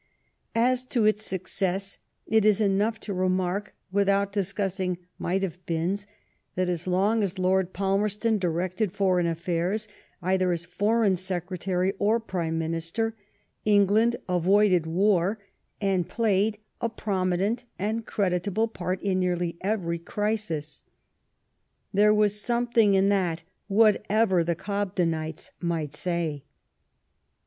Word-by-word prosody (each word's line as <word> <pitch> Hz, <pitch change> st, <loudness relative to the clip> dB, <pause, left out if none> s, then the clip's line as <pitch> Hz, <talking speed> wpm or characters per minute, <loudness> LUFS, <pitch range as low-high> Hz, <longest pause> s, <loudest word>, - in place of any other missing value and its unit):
As 250 Hz, +2 st, +2 dB
to 240 Hz, -4 st, +1 dB
its 215 Hz, 0 st, +2 dB
success, 190 Hz, 0 st, -2 dB, 0.3 s
it 220 Hz, -1 st, +3 dB
is 210 Hz, -1 st, +4 dB
enough 210 Hz, +2 st, +1 dB
to 205 Hz, -, -4 dB
re 185 Hz, 0 st, +1 dB
mark, 185 Hz, +2 st, -1 dB, 0.2 s
without 200 Hz, 0 st, +2 dB
discussing 195 Hz, -2 st, -1 dB
'* -, -, -46 dB
might 190 Hz, +2 st, 0 dB
have 180 Hz, -1 st, -4 dB
beens," 180 Hz, +5 st, -1 dB, 0.5 s
that 185 Hz, 0 st, 0 dB
as 175 Hz, 0 st, -2 dB
long 200 Hz, +5 st, +2 dB
as 200 Hz, -1 st, -2 dB
Lord 185 Hz, 0 st, +1 dB
Palmerston 205 Hz, +3 st, 0 dB
directed 185 Hz, +3 st, -1 dB
foreign 185 Hz, -3 st, +2 dB
affairs, 175 Hz, +5 st, -1 dB, 0.3 s
either 185 Hz, 0 st, +1 dB
as 170 Hz, -1 st, -2 dB
Foreign 205 Hz, +3 st, +2 dB
Secretary 185 Hz, +1 st, -1 dB
or 220 Hz, +3 st, +3 dB
Prime 170 Hz, -7 st, -3 dB
Minister, 165 Hz, +8 st, -2 dB, 0.5 s
England 210 Hz, +3 st, +4 dB
avoided 180 Hz, -1 st, +3 dB
war, 190 Hz, +3 st, +2 dB, 0.4 s
and 190 Hz, -4 st, 0 dB
played 215 Hz, -2 st, +1 dB, 0.2 s
a 230 Hz, -, 0 dB
prominent 200 Hz, +2 st, -1 dB
and 220 Hz, +4 st, -2 dB
creditable 200 Hz, +1 st, 0 dB
part 185 Hz, -3 st, -3 dB
in 190 Hz, -2 st, +1 dB
nearly 175 Hz, -2 st, 0 dB
every 185 Hz, -4 st, -1 dB
crisis. 205 Hz, -5 st, -3 dB, 1.1 s
There 210 Hz, +2 st, +5 dB
was 210 Hz, -1 st, +2 dB
something 235 Hz, -3 st, +3 dB
in 195 Hz, +1 st, +4 dB
that, 175 Hz, -5 st, 0 dB, 0.2 s
whatever 210 Hz, -2 st, +3 dB
the 170 Hz, 0 st, 0 dB
Gobdenites 180 Hz, -5 st, -2 dB
might 165 Hz, -4 st, -2 dB
say. 165 Hz, -3 st, -2 dB
190 Hz, 120 wpm, -26 LUFS, 180-210 Hz, 1.1 s, There